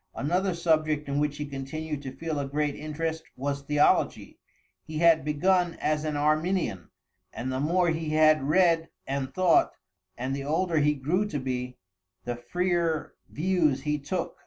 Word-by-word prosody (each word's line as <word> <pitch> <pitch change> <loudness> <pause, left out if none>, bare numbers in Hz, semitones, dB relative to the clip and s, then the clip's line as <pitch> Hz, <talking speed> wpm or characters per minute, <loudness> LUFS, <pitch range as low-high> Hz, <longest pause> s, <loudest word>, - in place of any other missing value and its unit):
Another 180 +5 0
subject 155 -3 +1
in 140 +1 -1
which 145 -1 -1
he 150 - -3
continued 145 +2 -5
to 135 -2 -6
feel 160 +2 -4
a 140 - -2
great 145 +1 -1
interest 160 +2 -3
was 140 +1 -3
theology. 145 +1 +1 0.4
He 155 - -6
had 165 -1 +5
begun 175 +4 +1
as 150 0 0
an 150 -1 -1
Arminian, 155 - 0 0.4
and 130 +2 -4
the 130 - -2
more 175 +4 +2
he 160 -1 -2
had 155 -1 +4
read 165 -1 +3 0.2
and 135 -1 -3
thought, 185 -3 +3 0.4
and 130 +3 -2
the 140 - -4
older 160 +3 +1
he 150 0 +3
grew 170 +10 0
to 155 - -3
be, 125 -1 -4 0.5
the 120 - -2
freer 170 +5 -1 0.2
views 155 -5 +1
he 150 0 0
took. 150 +6 -4
155 Hz, 160 wpm, -27 LUFS, 140-165 Hz, 0.5 s, had